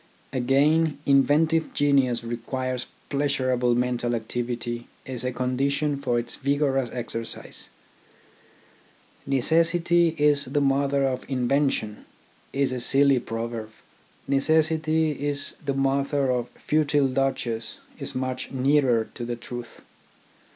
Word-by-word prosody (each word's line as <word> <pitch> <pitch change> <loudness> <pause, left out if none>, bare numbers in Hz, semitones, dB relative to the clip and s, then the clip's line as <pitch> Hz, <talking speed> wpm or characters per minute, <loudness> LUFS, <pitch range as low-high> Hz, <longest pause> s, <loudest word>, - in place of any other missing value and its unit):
Again, 145 +4 +2
inventive 155 +4 +3
genius 135 -5 +2
requires 125 +2 -3 0.2
pleasurable 130 -4 +1
mental 120 -1 0
activity 120 +1 -4 0.2
as 125 -2 -4
a 125 - -1
condition 140 +4 0
for 130 -4 -1
its 120 0 -1
vigorous 140 -2 0
exercise. 115 -2 -4 1.6
"Necessity 165 +4 +2
is 145 -1 +3
the 140 +3 0
mother 140 0 +2
of 130 -1 -1
invention" 130 -4 0 0.5
is 135 -1 0
a 130 - -2
silly 135 +2 +4
proverb. 115 -1 -5
gt - - -25 0.6
Necessity 155 +2 +2
is 145 0 0
the 140 -2 -1
mother 135 0 +1
of 125 -1 -1
futile 150 -2 +1
dodges 130 -4 -2
" - - -26
is - - -5
much 130 0 -3
nearer 130 -4 +2
to 120 - -6
the 120 0 -3
truth. 120 0 -9
135 Hz, 115 wpm, -25 LUFS, 120-145 Hz, 1.6 s, silly